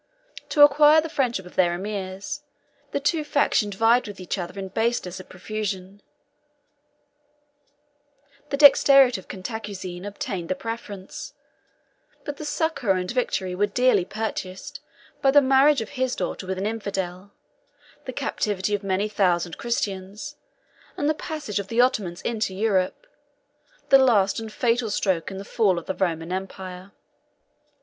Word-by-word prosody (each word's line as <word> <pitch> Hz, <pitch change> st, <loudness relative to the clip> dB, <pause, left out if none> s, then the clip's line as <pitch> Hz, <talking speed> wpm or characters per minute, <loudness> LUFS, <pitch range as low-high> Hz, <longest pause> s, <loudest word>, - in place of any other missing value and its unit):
To 295 Hz, -, +6 dB
acquire 295 Hz, +2 st, +7 dB
the 325 Hz, +1 st, -3 dB
friendship 240 Hz, -10 st, -1 dB
of 180 Hz, -, -13 dB
their 175 Hz, -2 st, +3 dB
emirs, 200 Hz, +7 st, -5 dB, 0.5 s
the 280 Hz, -, -2 dB
two 305 Hz, +3 st, 0 dB
factions 260 Hz, -8 st, +1 dB
vied 230 Hz, +3 st, +3 dB
with 205 Hz, -2 st, -9 dB
each 185 Hz, +2 st, -3 dB
other 175 Hz, +2 st, -6 dB
in 190 Hz, -1 st, -5 dB
baseness 205 Hz, -4 st, -1 dB
and 185 Hz, -, -12 dB
profusion: 195 Hz, 0 st, -5 dB, 2.5 s
the 280 Hz, -, -1 dB
dexterity 275 Hz, -5 st, +7 dB
of -, -, -25 dB
Cantacuzene 190 Hz, -3 st, -6 dB
obtained 195 Hz, -3 st, -5 dB
the 185 Hz, -, 0 dB
preference: 210 Hz, -4 st, -7 dB, 0.9 s
but 290 Hz, -2 st, -5 dB
the 305 Hz, -, -7 dB
succor 295 Hz, -, 0 dB
and 180 Hz, -1 st, -2 dB
victory 195 Hz, -7 st, -1 dB
were 205 Hz, +3 st, +1 dB
dearly 245 Hz, -2 st, +3 dB
purchased 195 Hz, -2 st, -5 dB, 0.4 s
by 270 Hz, -, +4 dB
the 290 Hz, +2 st, +7 dB
marriage 270 Hz, 0 st, +4 dB
of 220 Hz, -, -6 dB
his 255 Hz, -1 st, -1 dB
daughter 185 Hz, -, -4 dB
with 190 Hz, 0 st, -2 dB
an 195 Hz, -, -2 dB
infidel, 200 Hz, -3 st, -4 dB, 0.7 s
the -, -, -4 dB
captivity 205 Hz, -1 st, -2 dB
of 205 Hz, 0 st, -1 dB
many 195 Hz, +1 st, 0 dB
thousand 175 Hz, -6 st, 0 dB
Christians, 200 Hz, -4 st, -3 dB, 0.6 s
and 290 Hz, -, 0 dB
the 310 Hz, -, +3 dB
passage 300 Hz, -9 st, -4 dB
of 200 Hz, -, -5 dB
the 230 Hz, +3 st, -2 dB
Ottomans 200 Hz, -8 st, +1 dB
into 215 Hz, -5 st, -2 dB
Europe, 200 Hz, -, 0 dB, 0.8 s
the 270 Hz, -, +8 dB
last 215 Hz, -6 st, +3 dB
and 220 Hz, -1 st, -7 dB
fatal 240 Hz, -2 st, +1 dB
stroke 190 Hz, -4 st, 0 dB
in 190 Hz, -, -7 dB
the 195 Hz, -, -7 dB
fall 200 Hz, -6 st, +2 dB
of 170 Hz, -, -5 dB
the -, -, -2 dB
Roman 170 Hz, -3 st, -2 dB
empire. 185 Hz, 0 st, -6 dB
205 Hz, 145 wpm, -24 LUFS, 185-250 Hz, 2.5 s, the